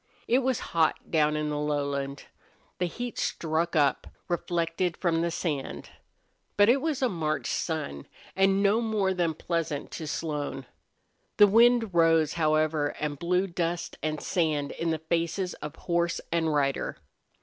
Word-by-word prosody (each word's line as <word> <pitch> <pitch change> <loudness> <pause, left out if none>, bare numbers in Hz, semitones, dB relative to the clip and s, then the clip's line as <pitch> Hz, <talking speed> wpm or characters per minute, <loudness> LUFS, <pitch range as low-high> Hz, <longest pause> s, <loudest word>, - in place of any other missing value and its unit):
It 245 +3 +4
was 260 -2 0
hot 160 -2 +1
down 150 -1 +3
in 150 0 -1
the 145 - -2
lowland. 140 -2 -2 0.6
The 180 - +1
heat 240 +7 -5
struck 165 +1 -1
up, 145 -3 +2 0.2
reflected 175 0 -1
from 165 -3 +1
the 170 - +1
sand. 155 -5 -4 0.7
But 205 +1 +6
it 265 +3 +4
was 300 -4 -1
a - - +5
March 160 -7 -2
sun, 150 - -3 0.3
and 195 +1 +3
no 205 +3 +3
more 210 -4 +1
than 170 -3 0
pleasant 165 -3 -3
to 160 - -6
Slone. 145 -4 -3 0.7
The 205 - +9
wind 230 0 +4
rose, 165 -2 +4
however, 155 -2 +1
and 145 -2 -3
blew 180 +2 +1
dust 175 -2 -3
and 155 -1 -2
sand 155 -6 0
in 165 - -2
the 160 - +1
faces 170 +3 -1
of 150 -1 -6
horse 170 -1 0
and 165 -2 +1
rider. 140 -2 0
165 Hz, 150 wpm, -28 LUFS, 150-185 Hz, 0.7 s, The